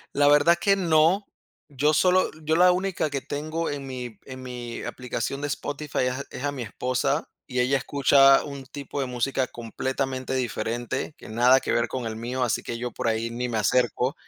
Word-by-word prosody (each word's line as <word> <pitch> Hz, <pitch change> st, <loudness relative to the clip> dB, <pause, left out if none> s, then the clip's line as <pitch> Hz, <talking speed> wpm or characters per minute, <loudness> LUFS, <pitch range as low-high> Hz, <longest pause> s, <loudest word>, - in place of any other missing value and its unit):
La 145 Hz, 0 st, +4 dB
verdad 145 Hz, +4 st, +5 dB
que 200 Hz, -1 st, +4 dB
no. 175 Hz, +2 st, +3 dB, 0.4 s
Yo 145 Hz, +2 st, +2 dB
solo 185 Hz, +3 st, +4 dB
yo 160 Hz, +1 st, +1 dB
la 180 Hz, +2 st, +6 dB
única 185 Hz, -3 st, -1 dB
que 140 Hz, -1 st, -2 dB
tengo 155 Hz, +4 st, -3 dB
en 140 Hz, -1 st, -5 dB
mi 125 Hz, -4 st, -7 dB
en 130 Hz, -1 st, -9 dB
mi 120 Hz, -2 st, -6 dB
aplicación 125 Hz, +2 st, -4 dB
de 145 Hz, -, -1 dB
Spotify 145 Hz, +1 st, -4 dB
es 125 Hz, -, +1 dB
a 135 Hz, +2 st, -4 dB
es -, -, -7 dB
a 145 Hz, -, 0 dB
mi 140 Hz, -3 st, -6 dB
esposa, 130 Hz, +5 st, -1 dB, 0.2 s
y 125 Hz, -2 st, 0 dB
ella 130 Hz, +2 st, +2 dB
escucha 135 Hz, 0 st, +5 dB
un 140 Hz, -2 st, -7 dB
tipo 140 Hz, 0 st, -6 dB
de 135 Hz, -, -1 dB
música, 125 Hz, +1 st, -1 dB
completamente 130 Hz, +3 st, -3 dB
diferente, 120 Hz, +2 st, -3 dB
que -, -, -12 dB
nada 125 Hz, +4 st, +5 dB
que -, -, -2 dB
ver 120 Hz, -, +2 dB
con 130 Hz, -2 st, -4 dB
el 110 Hz, -1 st, -4 dB
mío, 125 Hz, +3 st, -2 dB
así 120 Hz, -3 st, 0 dB
que 115 Hz, -, -5 dB
yo 120 Hz, +1 st, -4 dB
por -, -, -3 dB
ahí 115 Hz, +1 st, 0 dB
ni 125 Hz, +1 st, -3 dB
me 115 Hz, -, -1 dB
acerco. 125 Hz, +3 st, +1 dB
130 Hz, 200 wpm, -25 LUFS, 125-145 Hz, 0.4 s, la